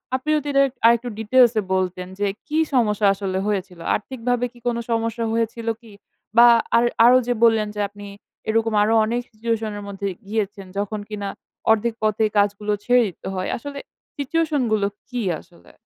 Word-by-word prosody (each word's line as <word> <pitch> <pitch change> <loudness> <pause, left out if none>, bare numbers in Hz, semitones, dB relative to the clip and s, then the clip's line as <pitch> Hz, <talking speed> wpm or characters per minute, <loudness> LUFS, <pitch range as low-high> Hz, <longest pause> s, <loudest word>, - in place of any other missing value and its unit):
আপনি 260 +4 -4
যদি 295 -1 -2
এটার 275 0 +5 0.2
আরেকটু 235 +1 +4
details 240 +2 +4
এ - - +1
বলতেন 185 -1 -2
যে, 205 - +1 0.2
কি 310 +1 0
সমস্যা 210 -5 +3
আসলে 195 -1 -3
হয়েছিল? 190 -4 -3 0.2
আর্থিকভাবে 245 +2 -2
কি 240 - -17
কোনো 235 -1 0
সমস্যা 230 0 -1
হয়েছিল 230 0 -2
কি? 225 - -15 0.5
বা 240 - +9 0.3
আর 235 - +4 0.2
আরো 250 +1 +7
যে 245 - +2
বললেন 220 -2 +4
যে - - -5
আপনি 205 0 -11 0.4
এরকম 225 0 +1
আরো 220 +2 +2
অনেক 240 +2 -1
situation 225 0 -2
এর 205 - -7
মধ্যে 200 0 -4 0.2
গিয়েছেন 205 -2 -3
যখন 205 +1 -2
কিনা 205 -2 -4 0.4
১/২ 225 +1 +2
পথেই 215 0 +2
কাজগুলো 205 +1 +1
ছেড়ে 250 0 +4
দিতে 185 - -9
হয়। 185 0 -2
আসলে 280 +3 -7 0.4
situation 300 0 0
গুলো 205 -2 +2 0.2
কি 245 -2 -3 0.2
আসলে? 170 - -20
225 Hz, 170 wpm, -22 LUFS, 205-240 Hz, 0.5 s, বা